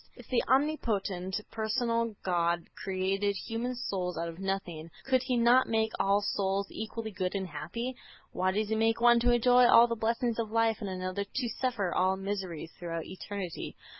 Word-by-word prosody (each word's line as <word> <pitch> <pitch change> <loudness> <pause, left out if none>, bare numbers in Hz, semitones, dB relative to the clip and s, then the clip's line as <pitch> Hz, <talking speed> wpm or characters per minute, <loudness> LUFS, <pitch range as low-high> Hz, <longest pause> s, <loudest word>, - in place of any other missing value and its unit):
If - - -14
the 250 - +2
omnipotent 215 -10 0
personal 230 0 0
God 170 -1 +1
created 195 +1 -1
human 235 +4 -3
souls 185 -7 -3
out 170 +1 -2
of 165 +1 -10
nothing, 185 -4 -3 0.2
could 260 -1 +3
He 255 -1 0
not 240 +2 +5
make 220 -1 +1
all 200 +1 +3
souls 200 0 0
equally 220 0 -5
good 185 -1 -2
and 195 -1 -1
happy? 180 - -5 0.4
Why 185 +1 0
does 210 +2 -1
He 220 - +1
make 225 +1 +2
one 240 0 +6
to 240 +1 +3
enjoy 245 +1 +5
all 235 0 +8
the 235 - -2
blessings 230 +1 0
of 225 -2 -1
life 225 -1 +2
and 200 - -3
another 185 +1 -3
to 240 +4 -3
suffer 225 -6 -1
all 190 +1 +2
miseries 190 -5 -4
throughout 165 -2 -4
eternity? 190 -2 -6
205 Hz, 175 wpm, -30 LUFS, 185-235 Hz, 0.4 s, all